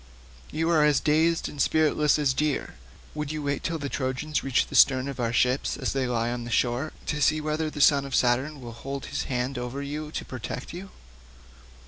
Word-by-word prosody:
You 160 Hz, +2 st, -1 dB
are 155 Hz, -3 st, +4 dB
as 150 Hz, -2 st, +4 dB
dazed 160 Hz, +2 st, +2 dB
and 145 Hz, -, -4 dB
spiritless 155 Hz, -1 st, +3 dB
as 145 Hz, -3 st, +2 dB
deer. 150 Hz, +1 st, -1 dB, 0.4 s
Would 150 Hz, -1 st, -4 dB
you 155 Hz, -1 st, -4 dB
wait 140 Hz, -1 st, -1 dB
till 170 Hz, -1 st, -2 dB
the 145 Hz, -2 st, -4 dB
Trojans 135 Hz, +3 st, -2 dB
reach 135 Hz, -2 st, +2 dB
the -, -, -13 dB
sterns 130 Hz, +1 st, +5 dB
of 135 Hz, -2 st, -7 dB
our 115 Hz, -1 st, 0 dB
ships 125 Hz, +3 st, +1 dB
as -, -, -2 dB
they 135 Hz, -2 st, 0 dB
lie 120 Hz, -1 st, 0 dB
on 120 Hz, 0 st, -4 dB
the 120 Hz, -, -7 dB
shore, 120 Hz, +5 st, 0 dB
to 150 Hz, -1 st, -2 dB
see 155 Hz, +3 st, +3 dB
whether 155 Hz, +1 st, -1 dB
the 150 Hz, -, -5 dB
son 140 Hz, -1 st, +5 dB
of 135 Hz, -1 st, -3 dB
Saturn 130 Hz, +4 st, +1 dB
will 120 Hz, -1 st, -7 dB
hold 135 Hz, +4 st, -6 dB
his -, -, -3 dB
hand 125 Hz, +1 st, -2 dB
over 125 Hz, +3 st, -4 dB
you 150 Hz, +2 st, -5 dB
to -, -, -4 dB
protect 130 Hz, +2 st, -6 dB
you?" 190 Hz, +3 st, -8 dB
140 Hz, 210 wpm, -26 LUFS, 125-150 Hz, 0.4 s, sterns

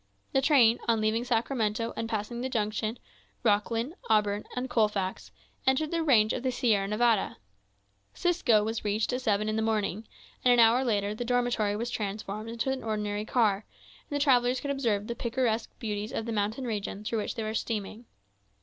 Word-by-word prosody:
The 270 Hz, -, +3 dB
train, 255 Hz, -5 st, +5 dB
on 230 Hz, -1 st, +3 dB
leaving 215 Hz, +2 st, +1 dB
Sacramento, 230 Hz, -2 st, 0 dB
and 225 Hz, 0 st, -3 dB
passing 225 Hz, +2 st, -3 dB
the 260 Hz, -, -2 dB
junction, 215 Hz, 0 st, -1 dB, 0.5 s
Roclin, 230 Hz, +6 st, +1 dB, 0.2 s
Auburn, 210 Hz, -1 st, +2 dB
and 250 Hz, +1 st, -2 dB
Colfax, 210 Hz, -6 st, 0 dB, 0.4 s
entered 280 Hz, +4 st, +2 dB
the 335 Hz, -1 st, 0 dB
range 235 Hz, -9 st, +4 dB
of -, -, -3 dB
the 260 Hz, 0 st, 0 dB
Sierra 220 Hz, -5 st, +1 dB
Nevada. 220 Hz, 0 st, +1 dB, 0.8 s
'Cisco 325 Hz, -12 st, +3 dB
was 220 Hz, +1 st, -3 dB
reached 215 Hz, +3 st, 0 dB
at 250 Hz, -, -1 dB
seven 210 Hz, -3 st, +1 dB
in 215 Hz, 0 st, -1 dB
the -, -, +1 dB
morning; 220 Hz, -1 st, -1 dB, 0.4 s
and 250 Hz, -, +5 dB
an 245 Hz, -, +5 dB
hour 230 Hz, +3 st, +6 dB
later 205 Hz, -4 st, 0 dB
the 220 Hz, -, -4 dB
dormitory 240 Hz, -4 st, +1 dB
was 235 Hz, +3 st, -3 dB
transformed 210 Hz, +1 st, -4 dB
into 235 Hz, +3 st, -1 dB
an 265 Hz, -, -3 dB
ordinary 210 Hz, -1 st, -2 dB
car, 215 Hz, -4 st, +2 dB, 0.5 s
and 290 Hz, -, -3 dB
the -, -, +3 dB
travellers 250 Hz, -2 st, +3 dB
could 285 Hz, -, -3 dB
observe 230 Hz, -7 st, 0 dB
the 235 Hz, -, -3 dB
picturesque 235 Hz, -1 st, -1 dB
beauties 210 Hz, -1 st, -4 dB
of 225 Hz, -, -3 dB
the 230 Hz, -, -3 dB
mountain 220 Hz, +4 st, -1 dB
region 210 Hz, -3 st, -4 dB
through 225 Hz, +1 st, -1 dB
which 210 Hz, -, -3 dB
they 225 Hz, -, -3 dB
were 215 Hz, 0 st, -3 dB
steaming. 220 Hz, 0 st, -3 dB
225 Hz, 185 wpm, -29 LUFS, 210-245 Hz, 0.8 s, hour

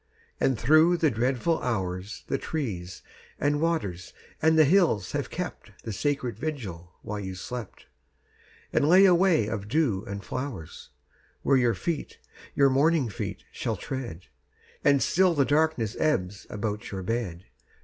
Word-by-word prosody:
And 130 Hz, -3 st, +2 dB
through 155 Hz, +7 st, +5 dB
the 160 Hz, -3 st, +2 dB
dreadful 130 Hz, +8 st, 0 dB
hours 95 Hz, -3 st, -3 dB
The 135 Hz, -, -1 dB
trees 95 Hz, -, -4 dB, 0.4 s
and 145 Hz, +1 st, +1 dB
waters 100 Hz, -, -2 dB, 0.3 s
and 160 Hz, 0 st, +4 dB
the 155 Hz, -, +7 dB
hills 150 Hz, -, +3 dB
have -, -, -2 dB
kept -, -, -6 dB
The 110 Hz, -, -4 dB
sacred 140 Hz, 0 st, -2 dB
vigil 95 Hz, -, -5 dB
while 105 Hz, 0 st, -4 dB
you 95 Hz, -2 st, -5 dB
slept, 115 Hz, +3 st, -7 dB, 0.9 s
And 145 Hz, -, +3 dB
lay 185 Hz, +3 st, +8 dB
a 185 Hz, -, +7 dB
way 175 Hz, -, +4 dB
of 105 Hz, -1 st, -4 dB
dew 115 Hz, -7 st, +1 dB
and 100 Hz, 0 st, -5 dB
flowers 125 Hz, -, -6 dB, 0.5 s
Where 135 Hz, -, +4 dB
your 120 Hz, -2 st, +2 dB
feet, 170 Hz, -4 st, -3 dB, 0.4 s
your 140 Hz, -1 st, +5 dB
morning 145 Hz, -1 st, +3 dB
feet, 100 Hz, -, -5 dB
shall -, -, -2 dB
tread. 125 Hz, -11 st, -5 dB, 0.6 s
And 140 Hz, -1 st, +4 dB
still 185 Hz, -1 st, +3 dB
the 140 Hz, -2 st, +3 dB
darkness 145 Hz, -8 st, +1 dB
ebbs 100 Hz, -10 st, 0 dB
about 105 Hz, +1 st, -4 dB
your 95 Hz, -2 st, -5 dB
bed. 95 Hz, -5 st, -3 dB
125 Hz, 150 wpm, -27 LUFS, 100-155 Hz, 0.9 s, lay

